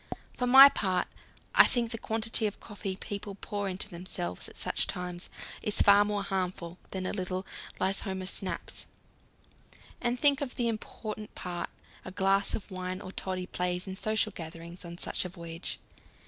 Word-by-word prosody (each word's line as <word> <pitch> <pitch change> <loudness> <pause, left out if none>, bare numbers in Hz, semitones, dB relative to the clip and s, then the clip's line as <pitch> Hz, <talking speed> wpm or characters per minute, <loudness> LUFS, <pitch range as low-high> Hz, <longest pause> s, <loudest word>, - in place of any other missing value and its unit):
For 250 - 0
my 265 +2 +12
part, 185 -9 +1 0.5
I - - +9
think 235 -2 +1
the 230 - -2
quantity 225 0 +1
of 205 - -6
coffee 200 -2 -5
people 200 0 -5
pour 205 0 -3
into 185 0 -3
themselves 170 - -4
at - - -12
such - - 0
times 180 0 -4 0.3
is 210 - +1
far 200 0 +8
more 205 -1 -1
harmful 180 -3 -2
than 190 -1 -3
a - - 0
little 185 -1 -2 0.3
Lysholmer 190 0 0
snaps. 190 0 -2 1.1
And 245 0 0
think 285 0 +4
of 270 -3 -3
the 240 -2 +1
important 215 -1 -5
part 175 -1 -4 0.3
a - - -6
glass 195 +1 +2
of 210 - -7
wine 185 0 -3
or 185 - -7
toddy 185 -1 -3
plays 180 0 -1
in 190 -1 -5
social 215 +2 +1
gatherings 170 0 -8
on 170 0 -8
such - - 0
a 180 - -4
voyage. 170 -1 -6
190 Hz, 165 wpm, -30 LUFS, 180-215 Hz, 1.1 s, my